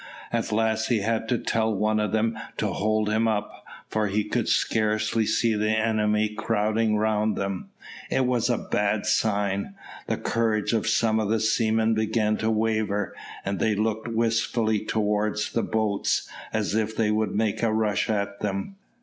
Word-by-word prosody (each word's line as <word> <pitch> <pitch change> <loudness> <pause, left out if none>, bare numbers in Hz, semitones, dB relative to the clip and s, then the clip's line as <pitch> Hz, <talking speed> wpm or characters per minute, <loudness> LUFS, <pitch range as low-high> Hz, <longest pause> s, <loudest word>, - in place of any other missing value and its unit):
At 115 -1 -1
last 110 0 +1
he 115 -4 +1
had 115 +1 -1
to 120 - +2
tell 110 0 0
one 110 +2 +1
of 105 -2 0
them 110 +1 +1 0.2
to - - 0
hold 110 +1 +1
him 110 +2 +2
up, 105 -2 -2 0.2
for 110 -1 0
he 105 +2 0
could - - -1
scarcely 110 0 +1
see 115 +1 +2
the 105 0 0
enemy 110 -1 +1
crowding 110 0 0
round 110 0 +1
them. 100 -1 -3 0.4
It 130 - +1
was 125 -1 +1
a 120 - +2
bad 105 0 -1
sign, 100 - 0 0.3
the - - 0
courage 110 -2 0
of 110 - 0
some 110 -1 +2
of 105 -2 -1
the 110 0 +2
seamen 110 0 +2
began 110 0 +1
to 110 - 0
waver, 110 -3 0 0.3
and 100 0 -2
they 110 -2 +2
looked 110 +2 -1
wistfully 115 -1 +1
towards 105 0 0
the 115 - 0
boats, 110 -3 0 0.2
as 110 -2 -1
if 110 0 0
they 110 -2 +2
would 110 0 0
make 110 -1 0
a 115 -2 +2
rush 110 -2 0
at 100 -1 -1
them. 105 - -3
110 Hz, 170 wpm, -25 LUFS, 105-110 Hz, 0.4 s, to